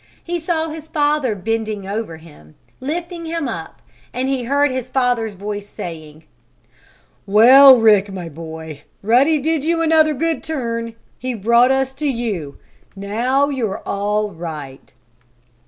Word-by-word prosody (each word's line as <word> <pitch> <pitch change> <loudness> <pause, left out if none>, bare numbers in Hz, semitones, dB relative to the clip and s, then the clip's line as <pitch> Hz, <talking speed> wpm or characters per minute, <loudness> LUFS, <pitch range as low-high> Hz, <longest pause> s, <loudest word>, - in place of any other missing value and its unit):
He 345 0 -3
saw 325 -1 -1
his 315 0 -8
father 295 -6 0
bending 215 0 -3
over 200 -5 -4
him, 145 - -17 0.2
lifting 335 +4 -5
him 325 -3 -2
up, 165 -9 -7 0.3
and 255 +2 -2
he 265 -3 -1
heard 285 +2 +2
his 255 -1 -4
father's 245 -5 0
voice 205 +1 -6
saying: 155 -2 -9 1.0
"Well, 255 +6 +8
Rick, 210 -3 +4
my 180 -3 -6
boy! 160 -1 -9 0.2
Ruddy 260 +9 +4
did 310 0 -1
you 330 +1 +1
another 315 -1 +3
good 325 +3 -1
turn! 230 -6 -4 0.2
He 255 0 -3
brought 235 +4 +4
us 265 0 +1
to 295 +3 -3
you! 215 - -3 0.4
Now 240 +8 0
you're 235 -8 -3
all 210 +1 -1
right!" 155 -6 -8
235 Hz, 140 wpm, -19 LUFS, 200-285 Hz, 1.0 s, Well